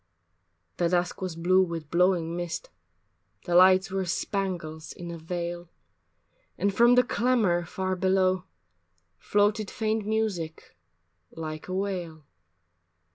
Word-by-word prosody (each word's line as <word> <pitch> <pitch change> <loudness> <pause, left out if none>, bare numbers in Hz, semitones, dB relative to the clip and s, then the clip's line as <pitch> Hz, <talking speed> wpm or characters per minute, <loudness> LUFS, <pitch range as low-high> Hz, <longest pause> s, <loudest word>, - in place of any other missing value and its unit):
III 85 0 -48
The 170 - +1
dusk 175 +1 0
was 185 -3 -3
blue 180 +3 +3
with 165 -4 -3
blowing 170 -1 +2
mist, 175 - -5 0.7
The 175 - -2
lights 185 +1 +6
were 190 0 -1
spangles 175 -4 -3
in 175 -1 -8
a 170 - -6
veil, 175 +1 -5 0.9
And 200 -1 +1
from 240 +4 +5
the 250 - +6
clamor 230 -9 +1
far 185 +2 -2
below 185 0 +2 0.7
Floated 205 0 +1
faint 220 -2 -1
music 205 - -2 0.5
like 155 -1 -7
a 185 - -3
wail. 175 -6 -3
180 Hz, 125 wpm, -27 LUFS, 165-195 Hz, 0.9 s, lights